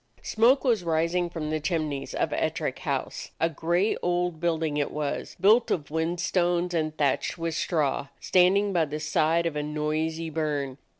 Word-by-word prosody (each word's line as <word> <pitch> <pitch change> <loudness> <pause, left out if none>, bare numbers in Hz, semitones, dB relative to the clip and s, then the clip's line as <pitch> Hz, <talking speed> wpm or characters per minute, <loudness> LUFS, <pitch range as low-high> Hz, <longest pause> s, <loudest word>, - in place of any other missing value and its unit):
Smoke 240 +5 +3
was 230 -8 +2
rising 170 +2 0
from 155 -3 -4
the 155 - 0
chimneys 155 -4 -2
of - - 0
Ettrick - - -1
House. - - -3
A 165 +1 +2
gray 175 +7 +1
old 175 -2 -1
building 160 -3 0
it 145 - 0
was, 150 -1 -4
built 215 +6 +5
of 150 -5 -1
whin 160 +2 -1
stones 175 0 0
and 155 -2 -1
thatched 140 +3 0
with 165 -1 -2
straw, 150 -4 0
standing 195 +2 +3
by 170 -3 +3
the 150 +1 -5
side 160 +2 +1
of 165 -3 -1
a 150 - -1
noisy 155 +2 -2
burn. 145 -4 -2
165 Hz, 170 wpm, -26 LUFS, 150-175 Hz, -, built